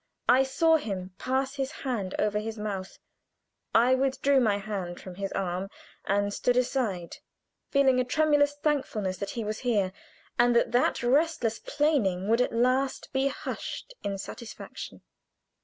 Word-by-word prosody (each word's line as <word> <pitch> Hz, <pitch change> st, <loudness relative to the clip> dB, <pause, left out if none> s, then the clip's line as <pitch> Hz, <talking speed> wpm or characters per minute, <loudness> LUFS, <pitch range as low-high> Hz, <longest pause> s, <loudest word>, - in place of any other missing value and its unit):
I 255 Hz, +2 st, +6 dB
saw 320 Hz, +5 st, +3 dB
him 190 Hz, -9 st, -5 dB
pass 265 Hz, +1 st, 0 dB
his 270 Hz, 0 st, -1 dB
hand 210 Hz, -8 st, -2 dB
over 210 Hz, 0 st, +1 dB
his 220 Hz, +1 st, -5 dB
mouth. 200 Hz, -3 st, -4 dB, 0.8 s
I 245 Hz, +3 st, +6 dB
withdrew 270 Hz, +1 st, +2 dB
my 215 Hz, -5 st, +3 dB
hand 195 Hz, -4 st, -5 dB
from 185 Hz, -, -9 dB
his 195 Hz, +1 st, -4 dB
arm 185 Hz, +1 st, -2 dB, 0.4 s
and 205 Hz, +1 st, +1 dB
stood 245 Hz, +3 st, +1 dB
aside, 230 Hz, -9 st, -1 dB, 0.5 s
feeling 270 Hz, -2 st, +4 dB
a -, -, +3 dB
tremulous 290 Hz, +2 st, +3 dB
thankfulness 260 Hz, -11 st, -1 dB
that 200 Hz, +1 st, -4 dB
he 230 Hz, -, -1 dB
was 215 Hz, 0 st, -3 dB
here, 210 Hz, -7 st, +1 dB, 0.5 s
and 240 Hz, 0 st, +5 dB
that 235 Hz, -, +3 dB
that 245 Hz, 0 st, +2 dB
restless 250 Hz, -3 st, +2 dB
plaining 215 Hz, -, +1 dB
would 230 Hz, +2 st, +4 dB
at -, -, +1 dB
last 255 Hz, +3 st, +1 dB
be 265 Hz, +1 st, +2 dB
hushed 390 Hz, -, -5 dB
in 200 Hz, -1 st, -2 dB
satisfaction. 225 Hz, +4 st, -8 dB
240 Hz, 150 wpm, -28 LUFS, 200-270 Hz, 0.8 s, I